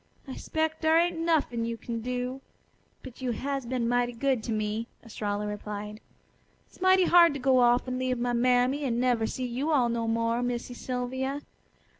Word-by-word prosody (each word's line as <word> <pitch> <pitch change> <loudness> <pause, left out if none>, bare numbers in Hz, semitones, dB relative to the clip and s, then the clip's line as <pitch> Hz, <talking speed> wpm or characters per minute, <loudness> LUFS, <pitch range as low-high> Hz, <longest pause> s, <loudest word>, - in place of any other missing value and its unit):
I 265 - -6
'spec' 315 0 -2
dar 320 0 +4
ain't 340 0 +1
nuffin' 310 -8 +1
you 230 0 -3
kin 230 0 -5
do. 250 +2 -3 0.6
But 260 -1 -11
you 250 -2 -1
has 275 +2 -3
been 245 -1 -1
mighty 245 0 +1
good 260 0 0
to - - -3
me," 215 +1 -2 0.2
Estralla 210 -2 -3
replied. 210 0 -6 0.6
"It's - - -22
mighty 375 0 +5
hard 340 -4 +6
to - - -4
go 260 0 +3
off 245 +1 +3
and 255 0 -2
leave 255 -1 0
my 245 0 -1
mammy 250 +3 +2
an' 240 -3 0
never 245 -3 +2
see 255 - -4
you 255 +6 -2
all 255 -6 +3
no 230 -1 -1
more, 230 +1 0
Missy 245 0 -3
Sylvia. 260 +3 -3
245 Hz, 185 wpm, -28 LUFS, 230-270 Hz, 0.6 s, hard